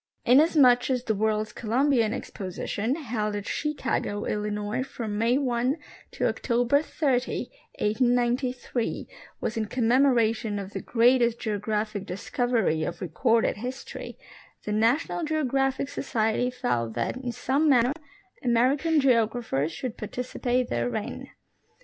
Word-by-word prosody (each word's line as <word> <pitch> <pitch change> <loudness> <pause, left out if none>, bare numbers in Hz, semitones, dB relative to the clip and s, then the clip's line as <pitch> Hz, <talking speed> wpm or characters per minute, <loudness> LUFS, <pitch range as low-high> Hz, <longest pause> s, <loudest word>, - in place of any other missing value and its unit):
Inasmuch 260 -2 +5
as 250 -2 0
the 220 - 0
World's 215 0 0
Columbian 240 0 +2
Exposition, 210 +1 -3
held 220 -8 -2
at 205 -1 -4
Chicago, 265 -8 -2
Illinois, 210 +2 -2
from 235 -5 -5
May 230 +4 +2
1 255 +1 0 0.4
to - - 0
October 245 +3 +1
30, 265 -5 -1 0.3
1893, 245 +2 0 0.3
was 225 - -3
in 220 - 0
com 235 +1 -1
memoration 235 -4 +3
of 200 0 -6
the - - -4
greatest 240 0 +3
geographic 210 -2 -2
discover}^ 205 -4 0
of 175 - -5
recorded 225 +4 +1
history, 250 +4 -7 0.5
the 210 - -2
National 235 +11 +1
Geographic 275 -3 0
Society, 240 -3 0
felt 120 - -2
that 115 - -1
in 250 -2 -4
some 275 +6 +1
manner 250 -1 +4 0.5
American 265 +7 +3
geographers 230 - +1
should 245 +7 -5
participate 250 +2 -2
therein. 120 - -3
240 Hz, 120 wpm, -26 LUFS, 215-260 Hz, 0.5 s, Inasmuch